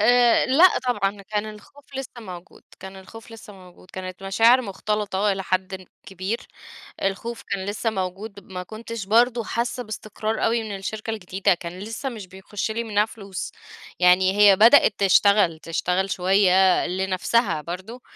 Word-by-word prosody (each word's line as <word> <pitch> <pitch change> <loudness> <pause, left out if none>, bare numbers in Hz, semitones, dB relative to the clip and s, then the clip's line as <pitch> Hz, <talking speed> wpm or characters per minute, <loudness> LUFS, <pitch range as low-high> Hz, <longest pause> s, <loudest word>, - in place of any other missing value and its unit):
آآ 240 +2 +4
لأ 320 +8 +5
طبعًا. 200 -4 -1
كان 210 +2 -3
الخوف 215 +7 -16
لسّه 260 -2 -7
موجود، 180 -4 -11 0.2
كان 190 0 -9
الخوف 225 +5 -13
لسّه 225 -2 -12
موجود. 185 -1 -17
كانت 185 0 -8
مشاعر 225 +6 +4
مُختلطة 205 0 -1
إلى 195 0 -4
حدٍ 185 0 -3 0.2
كبير، 190 +4 -4 0.6
الخوف 225 +4 -3
كان 190 -1 -3
لسّه 205 +3 -2
موجود، 195 +1 -5
ما 185 -1 -7
كنتش 220 +1 -7
برضه 235 +3 +3
حاسّة 235 +3 -3
باستقرار 215 0 -4
أوي 230 0 +1
من 210 -2 -5
الشركة 210 +3 -5
الجديدة، 195 -2 0
كان 175 +1 -8
لسّه 225 +6 -5
مش 215 -6 -9
بيخُش 190 +3 -5
لي 230 +2 -3
منّها 210 -2 +1
فلوس. 200 -4 -7 0.5
يعني 185 +2 +4
هي 205 -2 +7
بدأت 230 +8 +6
تشتغل 200 -3 +4
تشتغل 180 +4 -1
شوية 190 0 +3
لنفسها 185 0 0
برضه. 190 +10 -8
200 Hz, 150 wpm, -23 LUFS, 190-225 Hz, 0.6 s, هي